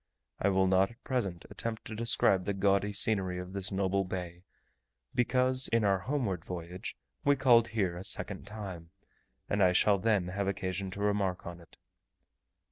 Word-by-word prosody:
I 100 Hz, -, +2 dB
will 95 Hz, -1 st, +3 dB
not 95 Hz, +1 st, +3 dB
at 115 Hz, +2 st, -18 dB
present 100 Hz, -, -2 dB
attempt 115 Hz, -1 st, -4 dB
to 110 Hz, -, -6 dB
describe 105 Hz, -4 st, +3 dB
the 100 Hz, -, -1 dB
gaudy 100 Hz, +1 st, +2 dB
scenery 95 Hz, -4 st, +2 dB
of 90 Hz, +1 st, -7 dB
this 100 Hz, +1 st, -3 dB
noble 95 Hz, 0 st, +1 dB
bay, 90 Hz, -2 st, -6 dB, 0.7 s
because, 130 Hz, +1 st, +2 dB
in 115 Hz, -1 st, +2 dB
our 100 Hz, -2 st, +3 dB
homeward 110 Hz, -, -2 dB
voyage, 90 Hz, +1 st, -7 dB, 0.3 s
we 145 Hz, -, +4 dB
called 120 Hz, -4 st, +5 dB
here 100 Hz, -6 st, -1 dB
a 90 Hz, -, -7 dB
second 100 Hz, -, 0 dB
time, 95 Hz, -6 st, -7 dB, 0.6 s
and 100 Hz, -, 0 dB
I 90 Hz, -1 st, +5 dB
shall 100 Hz, +2 st, +4 dB
then 100 Hz, -4 st, +1 dB
have 100 Hz, +1 st, -2 dB
occasion 95 Hz, 0 st, -2 dB
to 100 Hz, +2 st, -7 dB
remark 100 Hz, -3 st, 0 dB
on 85 Hz, 0 st, -7 dB
it. 85 Hz, -, -18 dB
100 Hz, 170 wpm, -31 LUFS, 90-110 Hz, 0.7 s, called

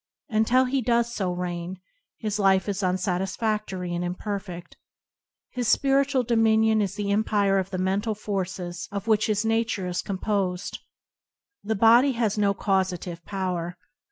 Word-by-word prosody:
Until 235 Hz, +3 st, +3 dB
he 265 Hz, +1 st, 0 dB
does 235 Hz, 0 st, +1 dB
so 190 Hz, -5 st, -1 dB
reign, 175 Hz, 0 st, -4 dB, 0.4 s
his 215 Hz, -2 st, -3 dB
life 190 Hz, -1 st, +3 dB
is 200 Hz, 0 st, -2 dB
unsatisfa&ory 185 Hz, +1 st, -1 dB
and 175 Hz, 0 st, -2 dB
imperfeft. 180 Hz, -1 st, -5 dB, 0.8 s
His 245 Hz, -2 st, -2 dB
spiritual 275 Hz, +1 st, +3 dB
dominion 220 Hz, -1 st, +3 dB
is 195 Hz, -1 st, -2 dB
the 205 Hz, -1 st, -2 dB
empire 200 Hz, -2 st, +2 dB
of 190 Hz, 0 st, -3 dB
the 190 Hz, -, -4 dB
mental 195 Hz, +4 st, 0 dB
forces 185 Hz, -4 st, -4 dB
of 200 Hz, 0 st, -4 dB
which 215 Hz, -2 st, +2 dB
his 210 Hz, 0 st, 0 dB
nature 225 Hz, -3 st, 0 dB
is 180 Hz, 0 st, -2 dB
com 195 Hz, -, -4 dB
posed. 195 Hz, -2 st, -2 dB, 0.8 s
The 220 Hz, +2 st, -1 dB
body 235 Hz, +6 st, +5 dB
has 230 Hz, -4 st, 0 dB
no 200 Hz, -2 st, +2 dB
causative 185 Hz, -3 st, -1 dB
power. 180 Hz, -3 st, -3 dB
200 Hz, 145 wpm, -25 LUFS, 185-220 Hz, 0.8 s, body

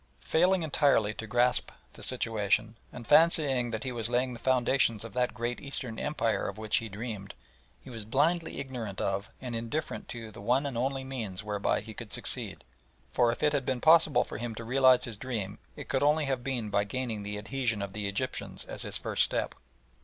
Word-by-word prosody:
Failing 180 Hz, +2 st, +3 dB
entirely 140 Hz, -8 st, +3 dB
to 110 Hz, +1 st, -7 dB
grasp 120 Hz, +2 st, +2 dB, 0.2 s
the -, -, -13 dB, 0.2 s
position, 110 Hz, -1 st, +1 dB, 0.2 s
and 120 Hz, -1 st, -9 dB
fancying 145 Hz, -5 st, +4 dB
that 110 Hz, -1 st, -3 dB
he 130 Hz, -, -3 dB
was 115 Hz, -2 st, 0 dB
laying 125 Hz, +1 st, +1 dB
the 120 Hz, -, -8 dB
foundations 125 Hz, -3 st, +2 dB
of 115 Hz, -, -9 dB
that 125 Hz, -1 st, 0 dB
great 120 Hz, 0 st, -3 dB
Eastern 130 Hz, -5 st, -3 dB
Empire 115 Hz, -7 st, 0 dB
of -, -, -8 dB
which 110 Hz, -1 st, +1 dB
he 115 Hz, -2 st, -3 dB
dreamed, 105 Hz, -1 st, -6 dB, 0.5 s
he 130 Hz, -, -10 dB
was 115 Hz, -3 st, -6 dB
blindly 155 Hz, +9 st, +1 dB
ignorant 120 Hz, -8 st, -5 dB
of 100 Hz, +2 st, -1 dB
and 125 Hz, -2 st, -5 dB
indifferent 115 Hz, +7 st, -3 dB
to 115 Hz, -2 st, -6 dB
the 105 Hz, -, -11 dB
one 125 Hz, +7 st, +2 dB
and 140 Hz, -3 st, -3 dB
only 135 Hz, +3 st, -1 dB
means 110 Hz, -8 st, -5 dB
whereby 105 Hz, -1 st, 0 dB
he -, -, -9 dB
could -, -, -9 dB
succeed, -, -, 0 dB, 0.5 s
for 120 Hz, -1 st, +4 dB
if 120 Hz, -, -5 dB
it 150 Hz, 0 st, +4 dB
had 140 Hz, -2 st, +1 dB
been 130 Hz, -1 st, -1 dB
possible 155 Hz, -4 st, +6 dB
for -, -, -7 dB
him 120 Hz, -1 st, -4 dB
to 115 Hz, -, -6 dB
realise 130 Hz, +1 st, +5 dB
his 115 Hz, -4 st, -5 dB
dream 105 Hz, -5 st, -4 dB, 0.2 s
it -, -, -8 dB
could 135 Hz, -, 0 dB
only 150 Hz, +1 st, +3 dB
have 135 Hz, -3 st, -1 dB
been 120 Hz, -6 st, -2 dB
by 100 Hz, 0 st, +3 dB
gaining 115 Hz, 0 st, -3 dB
the 105 Hz, 0 st, -4 dB
adhesion 115 Hz, 0 st, -1 dB
of 100 Hz, -1 st, -4 dB
the 105 Hz, -1 st, -3 dB
Egyptians 100 Hz, +6 st, -3 dB
as -, -, -6 dB
his -, -, -3 dB
first -, -, -1 dB
step. -, -, +1 dB
120 Hz, 205 wpm, -30 LUFS, 110-135 Hz, 0.5 s, possible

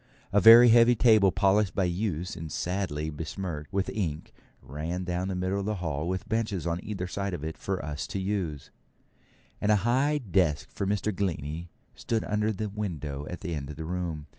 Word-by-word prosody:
A 100 Hz, -, +5 dB
very 115 Hz, +4 st, +10 dB
heavy 120 Hz, +1 st, +6 dB
table, 110 Hz, -5 st, +5 dB
polished 95 Hz, +1 st, +2 dB
by 95 Hz, -, +2 dB
use, 90 Hz, -1 st, -2 dB
and 80 Hz, -2 st, -7 dB
sadly 85 Hz, -3 st, -2 dB
besmirched 80 Hz, +1 st, -5 dB
with 100 Hz, -1 st, 0 dB
ink, 80 Hz, -8 st, -3 dB, 0.3 s
ran 80 Hz, +6 st, -5 dB
down 90 Hz, +1 st, -2 dB
the 95 Hz, -, -2 dB
middle 95 Hz, +2 st, -1 dB
of 100 Hz, -, -3 dB
the 105 Hz, -, 0 dB
hall 80 Hz, -4 st, -3 dB
with 95 Hz, +3 st, -3 dB
benches 110 Hz, -6 st, -1 dB
on 85 Hz, +1 st, -2 dB
either 100 Hz, -4 st, -4 dB
side 100 Hz, 0 st, -3 dB
of 75 Hz, -, -8 dB
it 80 Hz, +1 st, -4 dB
for 95 Hz, -6 st, -3 dB
us 75 Hz, 0 st, -4 dB
to 100 Hz, -, -4 dB
use; 95 Hz, -8 st, -3 dB, 0.9 s
and 105 Hz, -, +2 dB
a -, -, +6 dB
high 135 Hz, +5 st, +2 dB
desk 85 Hz, -, 0 dB
for 100 Hz, -, -3 dB
Mr. 105 Hz, 0 st, -1 dB
Glennie 85 Hz, -3 st, -3 dB, 0.2 s
stood 115 Hz, -1 st, -2 dB
under 105 Hz, +1 st, 0 dB
the 105 Hz, +1 st, -3 dB
window 80 Hz, -9 st, -5 dB
at 90 Hz, -, -7 dB
the 85 Hz, -, -4 dB
end 70 Hz, -3 st, -4 dB
of 75 Hz, -, -7 dB
the 80 Hz, +2 st, -6 dB
room. 85 Hz, -3 st, -3 dB
95 Hz, 195 wpm, -28 LUFS, 80-105 Hz, 0.9 s, very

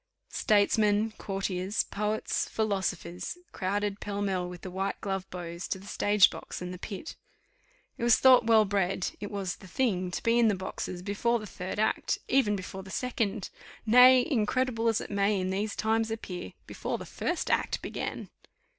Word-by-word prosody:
Statesmen, 210 Hz, 0 st, +3 dB
courtiers, 195 Hz, 0 st, -1 dB
poets, 210 Hz, +1 st, -2 dB
philosophers, 190 Hz, -, -2 dB
crowded 200 Hz, +2 st, -2 dB
pell 205 Hz, -1 st, -4 dB
mell 185 Hz, -3 st, -1 dB
with 180 Hz, -1 st, -9 dB
the 185 Hz, -, -7 dB
white 195 Hz, +2 st, -2 dB
gloved 195 Hz, -1 st, -3 dB
beaux 170 Hz, -1 st, -6 dB
to 180 Hz, -, -3 dB
the 190 Hz, -, -13 dB
stage 205 Hz, -1 st, +4 dB
box -, -, -7 dB
and 180 Hz, 0 st, -5 dB
the 180 Hz, -, -8 dB
pit. 210 Hz, -, -7 dB, 0.8 s
It -, -, -3 dB
was 235 Hz, -1 st, +6 dB
thought 255 Hz, -3 st, +6 dB
well 220 Hz, -2 st, +6 dB
bred, 195 Hz, -2 st, 0 dB
it 205 Hz, -, -5 dB
was 195 Hz, -3 st, -3 dB
the 190 Hz, -, -13 dB
thing 185 Hz, -4 st, 0 dB
to 180 Hz, -, -4 dB
be 230 Hz, +1 st, +3 dB
in 235 Hz, -, +5 dB
the 210 Hz, -, +3 dB
boxes 185 Hz, -1 st, -5 dB
before 210 Hz, +4 st, +1 dB
the 215 Hz, -, -7 dB
third 185 Hz, -1 st, -6 dB
act, 215 Hz, -, +1 dB
even 250 Hz, -6 st, +3 dB
before 190 Hz, 0 st, -6 dB
the 190 Hz, -, -12 dB
second, 225 Hz, -3 st, -2 dB, 0.3 s
nay, 250 Hz, +3 st, +7 dB
incredible 250 Hz, -3 st, +1 dB
as 225 Hz, -2 st, +2 dB
it -, -, -8 dB
may 200 Hz, 0 st, +2 dB
in 185 Hz, 0 st, -1 dB
these 200 Hz, +2 st, -2 dB
times 225 Hz, +1 st, +1 dB
appear, 195 Hz, -5 st, -6 dB
before -, -, -4 dB
the -, -, -8 dB
first 350 Hz, -2 st, -2 dB
act -, -, +1 dB
began. -, -, -5 dB
205 Hz, 175 wpm, -29 LUFS, 190-225 Hz, 0.8 s, nay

